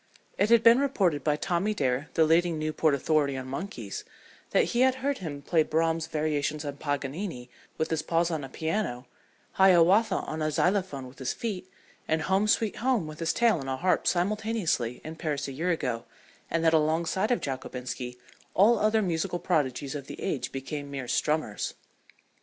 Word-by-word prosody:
It 205 - +2
had 230 -1 +6
been 230 +2 +7
reported 190 - +1
by 150 -1 +2
Tommy 185 +6 -1
Dare, 135 -2 0
the 160 - +5
leading 165 +1 +3
Newport 155 -1 +1
authority 140 -1 +1
on 130 - -5
monkeys, 130 - -5 0.5
that - - +4
he 240 - +2
had 260 0 +4
heard 280 -1 0
him 145 -6 -6
play 165 +2 +3
Brahm's 160 +1 0
"Variations 150 -1 -1
on 145 -1 -5
Paganini" 145 -1 -4 0.3
with 160 - -1
his 160 -1 +1
paws 170 +2 +1
on 155 -3 -2
a 135 - -7
piano, 160 - -2 0.5
"Hiawatha" 190 +3 +5
on 155 0 -3
a 155 - +1
xylophone 180 -4 0
with 125 - -15
his 130 - -2
feet, 185 -5 -5 0.4
and 160 0 +1
"Home, 195 +4 +2
Sweet 215 0 +1
Home" 235 -5 +1
with 155 0 -9
his 165 -1 +1
tail 230 -7 +3
on 135 - -6
a 130 0 -2
harp 180 +6 +1
simultaneously, 190 - 0
in 160 +1 -7
Paris 150 -4 -2
a - - -5
year 160 +7 -2
ago, 125 -9 -1 0.4
and 165 0 0
that 160 - +5
alongside 160 +5 +1
of 245 - +2
Jockobinski 125 -2 -5 0.4
all 220 +5 +5
other 215 +1 +3
musical 175 -1 -1
prodigies 145 -6 -1
of 140 -2 -6
the - - -8
age 135 -10 -2
became 140 +2 -5
mere 135 -2 -5
strummers. 150 -6 -1
160 Hz, 180 wpm, -28 LUFS, 140-190 Hz, 0.5 s, been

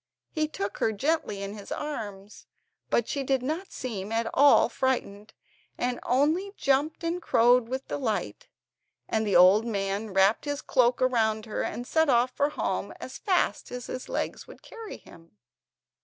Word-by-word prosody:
He 310 -1 0
took 200 -9 -5
her 220 - +2
gently 220 -4 -1
in 200 +1 -5
his 205 -2 -11
arms, 210 -9 -6 0.4
but 235 - +1
she 280 - -2
did 265 -1 0
not 320 +8 -3
seem 210 -5 -5
at 225 0 0
all 285 +1 +6
frightened, 225 -5 -2 0.5
and 245 0 -1
only 315 +10 +1
jumped 280 +4 +1
and 340 +2 -2
crowed 240 -4 +4
with 260 +1 -4
delight; 270 - -3 0.6
and 220 -1 0
the 195 - +1
old 185 +5 +7
man 200 0 -2
wrapped 195 +6 +3
his 290 -1 -3
cloak 245 -1 +2
round 220 -4 +1
her, 215 - -3
and 245 - -4
set 320 +3 +2
off 245 0 +3
for 285 +2 +1
home - - -2
as - - -8
fast 380 -4 0
as 245 0 -6
his 255 - -6
legs - - -3
would - - -14
carry 455 -2 -9
him. 165 -9 -18
245 Hz, 165 wpm, -27 LUFS, 210-285 Hz, 0.6 s, old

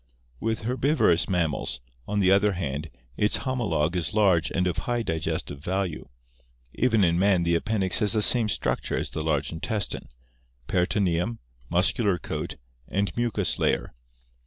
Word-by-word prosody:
With 110 0 -2
herbivorous 125 - +2
mammals, 85 -10 0 0.3
on 105 0 0
the 95 -1 +4
other 100 +1 +4
hand, 75 -3 -4 0.3
its 105 - +2
homologue 105 - 0
is 90 +4 -1
large 90 -7 +3
and 90 - 0
of 90 -2 -1
high 120 -1 0
digestive 80 -4 -3
value. 95 -2 -3 0.6
Even 115 -4 +2
in 85 -1 +2
man 95 -2 +3
the 85 0 +1
appendix 95 +1 +2
has 105 -3 +2
the 110 -2 +2
same 115 -2 +5
structure - - -1
as - - -2
the 80 - -3
large 75 -2 0
intestine 100 +6 -3 0.3
— - - -38
peritoneum, 90 +3 +1 0.3
muscular 95 +2 +2
coat, - - -5 0.3
and 100 0 -1
mucous 120 -2 0
layer. - - 0
95 Hz, 150 wpm, -26 LUFS, 85-105 Hz, 0.6 s, same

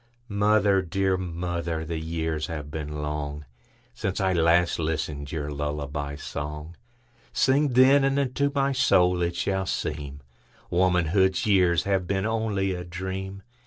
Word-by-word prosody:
Mother, 100 -1 +3
dear 95 +2 0
mother, 85 -2 -3
the 80 0 -3
years 80 -1 -2
have 75 -3 -6
been 75 -1 -5
longSince 75 +4 -6
I 95 -1 +2
last 85 0 +3
listened 75 -3 -3
your 75 -2 -3
lullaby 75 0 -3
song:Sing, 120 - -3
then, 135 +3 +6
and 135 0 +2
unto 140 +1 0
my 140 0 +2
soul 90 -9 +3
it 85 0 0
shall 95 0 -1
seemWomanhood's 85 +6 -1
years 90 -6 +3
have 95 -2 0
been 95 +1 0
only 110 -4 0
a 90 -1 -5
dream. 95 +2 -6
90 Hz, 125 wpm, -26 LUFS, 75-100 Hz, -, then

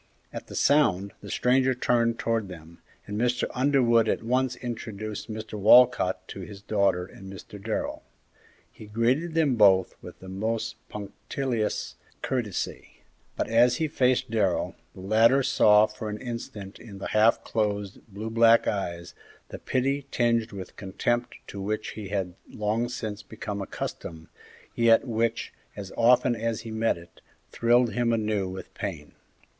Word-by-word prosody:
At - - -7
the - - -9
sound, 100 -10 +3
the 100 - -9
stranger 130 +3 +2
turned 115 -1 +1
towards 115 -3 -1
them, 85 -2 -12 0.2
and 105 +2 -3
Mr. 125 0 +1
Underwood 125 -4 +3
at - - -1
once 125 +2 +1
introduced 110 -3 -6
Mr. 110 -1 -6
Walcott 115 -2 +5
to - - -7
his 100 +2 -9
daughter 100 -3 +1
and 95 +1 -12
Mr. 100 +1 -11
Darrell. 110 0 -3 0.7
He 110 - -13
greeted 125 +10 0
them 150 -7 +2
both 95 -3 +5
with - - -11
the 95 - -12
most 110 +4 -3
punctilious 110 +3 -3 0.3
courtesy, 120 -7 -4 0.3
but - - -1
as 120 +2 +4
he 160 - 0
faced 130 -4 +1
Darrell, 100 -5 +1 0.2
the 95 - -10
latter 115 +7 +4
saw 105 -3 +5
for 110 0 -7
an 105 - -4
instant 115 -5 -7
in 105 -4 -11
the 95 - -5
half 110 +2 +3
closed, 105 -2 -2
blue 110 +2 -6
black 115 0 +5
eyes, 85 -4 -3 0.4
the - - -8
pity 135 +2 -1
tinged 115 -2 +1
with 95 -2 -9
contempt 110 +5 -2
to 100 - -8
which 105 +2 -2
he 105 -2 -7
had 95 -3 -2 0.2
long 110 +3 -1
since 110 -4 -5
become 105 -2 -6
accustomed, 80 -4 -6 0.4
yet 115 +1 +4
which, 115 0 -1 0.2
as 100 -2 -8
often 120 +1 +4
as 115 0 -2
he 115 - -8
met 110 -3 +1
it, 85 0 -16 0.3
thrilled 120 -1 +3
him 120 +1 +1
anew 105 -4 0
with 95 0 -8
pain. - - -6
110 Hz, 150 wpm, -26 LUFS, 100-120 Hz, 0.7 s, Walcott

